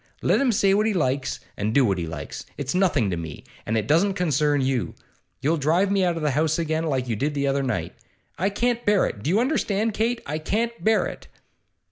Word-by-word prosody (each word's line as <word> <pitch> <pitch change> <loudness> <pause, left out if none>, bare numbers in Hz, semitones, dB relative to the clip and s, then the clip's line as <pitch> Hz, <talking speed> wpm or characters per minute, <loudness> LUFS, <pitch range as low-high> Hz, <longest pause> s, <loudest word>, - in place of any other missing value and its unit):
Let - - +3
him 265 -3 +3
say 195 -2 +3
what 210 +2 +2
he 215 - 0
likes 135 -5 0 0.2
and 105 +2 -2
do 140 -2 +5
what 95 -4 +1
he 85 - -3
likes. 80 -2 -6
It's 140 -2 -3
nothing 170 - +2
to 90 - -2
me, 80 -3 -7 0.2
and 110 +1 +1
it 105 - 0
doesn't 175 - +2
concern 150 -4 +1
you. 130 -3 -1 0.5
You'll 160 +4 +1
drive 170 +7 +2
me 195 -1 +2
out 175 -2 +1
of 160 - -4
the 150 - +2
house 155 +3 +1
again, 160 -1 -1
like 130 -4 -1
you 115 - -1
did 145 +7 -1
the 140 0 0
other 140 0 +1
night. 125 -4 -2 0.4
I 190 +5 0
can't 240 +3 0
bear 205 -2 +3
it. 100 - -5
Do 145 - -2
you 195 +5 +3
understand, 225 -5 0
Kate? 230 +3 0
I 150 +2 -3
can't 230 +8 -2
bear 220 0 +3
it! - - -7
155 Hz, 230 wpm, -24 LUFS, 130-200 Hz, 0.5 s, do